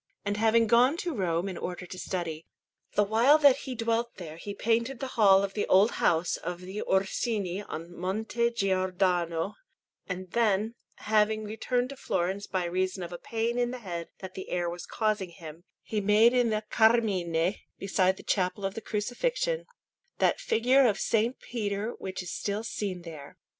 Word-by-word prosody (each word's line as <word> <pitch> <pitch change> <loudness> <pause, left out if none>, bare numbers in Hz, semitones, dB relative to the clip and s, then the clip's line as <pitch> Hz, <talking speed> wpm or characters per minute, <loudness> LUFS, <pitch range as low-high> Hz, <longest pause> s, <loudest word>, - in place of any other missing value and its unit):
And 205 0 0
having 225 +2 +4
gone 245 +7 +4
to 345 -2 -3
Rome 180 -5 0
in 185 -3 -5
order 180 0 -5
to 180 +1 -9
study, 165 -3 -4 0.5
the 205 - +5
while 230 +8 +5
that 285 -3 +6
he 255 - -3
dwelt 230 +1 -1
there 160 -4 -8
he 200 +4 -7
painted 235 +3 0
the 265 - -4
hall 195 -3 +6
of 195 -1 -3
the 205 - -1
old 200 +4 +5
house 165 +1 +2
of 180 0 -5
the 190 +3 -6
Orsini 195 0 0
on 170 -3 -8
Monte 220 +6 -1
Giordano; 185 -4 0 0.5
and 185 -1 -5
then, 220 -1 +1 0.2
having 215 0 +1
returned 245 +4 -1
to 275 - -7
Florence 190 -4 -2
by 185 -2 -1
reason 185 +1 -1
of 175 0 -7
a 175 - -6
pain 230 +1 -2
in 240 0 +1
the 255 - -5
head 175 -7 -6
that 190 -1 -7
the 190 - -7
air 175 -1 -1
was 175 0 -6
causing 215 -4 -1
him, 165 0 -11 0.2
he 215 -2 -2
made 210 +4 +5
in 245 -2 +3
the 215 0 -1
Carmine, 195 -6 +2 0.2
beside 190 -1 +1
the - - -11
Chapel 190 +1 0
of 195 - -2
the 225 - -6
Crucifixion, 480 - -1 0.5
that - - +2
figure 260 - +3
of 210 - +2 0.2
S. 225 +1 +3
Peter 210 -1 -3
which 185 -1 -5
is 180 +1 -6
still 205 +2 -2
seen 195 -5 -4
there. 155 -4 -10
200 Hz, 180 wpm, -28 LUFS, 180-230 Hz, 0.5 s, that